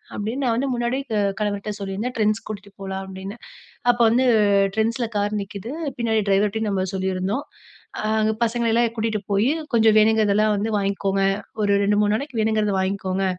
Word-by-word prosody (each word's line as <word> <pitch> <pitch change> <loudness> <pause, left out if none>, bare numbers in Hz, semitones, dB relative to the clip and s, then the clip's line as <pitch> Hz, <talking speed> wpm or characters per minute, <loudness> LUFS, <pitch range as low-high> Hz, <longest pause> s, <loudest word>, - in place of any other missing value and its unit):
அப்டின்னு 225 +7 -3
நான் 235 -2 +2
வந்து 270 +2 0
முன்னாடியே 240 +3 -1 0.4
கணவர்ட்ட 205 0 -2
சொல்லியிருந்தேன் 200 +6 -3
Trends 215 0 +2
கூட்டிட்டு 205 -1 -8
போலாம் 190 0 -4
அப்டின்னு. 190 +3 -8 0.5
அப்ப 240 0 0
வந்து 250 +3 +3 0.5
Trendsல 230 +2 0
கார் 205 +1 0
நிக்கிது 200 +4 -7 0.3
பின்னாடி 225 -2 +1
டிரைவர்ட்டயும் 210 +2 +1
நம்ம 190 -1 0
சொல்லியிருந்தோம். 190 +7 -2 0.5
அ - - -2 0.2
அங்க 215 0 +2
பசங்கள 235 0 +1
எல்லாம் 235 0 +2
கூட்டிட்டு 220 -1 -1
போய் 200 +3 +2 0.3
கொஞ்சம் 225 -2 +5
வேணுங்கிறதெல்லாம் 215 -1 +3
வந்து 210 +3 -1
வாய்ங்கோங்க. 195 -1 0 0.4
ஒரு 205 -1 +1
2 205 +1 +2
3 205 0 +2
நாளைக்கு 260 +1 -3
வேணுங்குறத 215 -1 +1
வாய்ங்கோங்க. 190 0 -1
215 Hz, 155 wpm, -22 LUFS, 200-230 Hz, 0.5 s, கொஞ்சம்